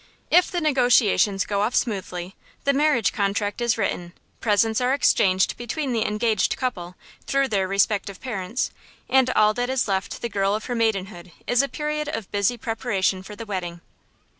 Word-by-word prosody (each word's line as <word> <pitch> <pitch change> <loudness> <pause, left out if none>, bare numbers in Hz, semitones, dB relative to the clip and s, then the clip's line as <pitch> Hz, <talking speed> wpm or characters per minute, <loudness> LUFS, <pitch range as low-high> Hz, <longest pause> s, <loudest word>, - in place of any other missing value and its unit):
If 355 +1 +5
the 350 - -2
negotiations 245 -8 +3
go 200 -1 -1
off 220 +4 0
smoothly, 185 -5 -2 0.3
the 280 - +2
marriage 285 -6 +2
contract 205 +1 -1
is 235 -1 +1
written, 175 -5 -2 0.3
presents 220 +1 +2
are 255 +2 +2
exchanged 190 -8 +3
between 250 +3 -3
the 225 -2 0
engaged 215 -1 0
couple, 180 -9 -4 0.3
through 275 -1 +1
their 195 -3 0
respective 200 0 0
parents, 225 -1 -3 0.4
and 265 -1 +3
all 215 -3 +4
that 245 +2 -2
is 260 -2 0
left 195 +2 -2
the - - 0
girl 200 -2 0
of 220 - -5
her 250 - -3
maidenhood 195 -6 -2
is 245 +1 +3
a 275 - -2
period 300 0 -3
of 225 -9 -5
busy 205 +4 +1
preparation 215 -5 -1
for 210 +2 -10
the 230 - -8
wedding. 175 -4 -5
220 Hz, 170 wpm, -23 LUFS, 195-250 Hz, 0.4 s, If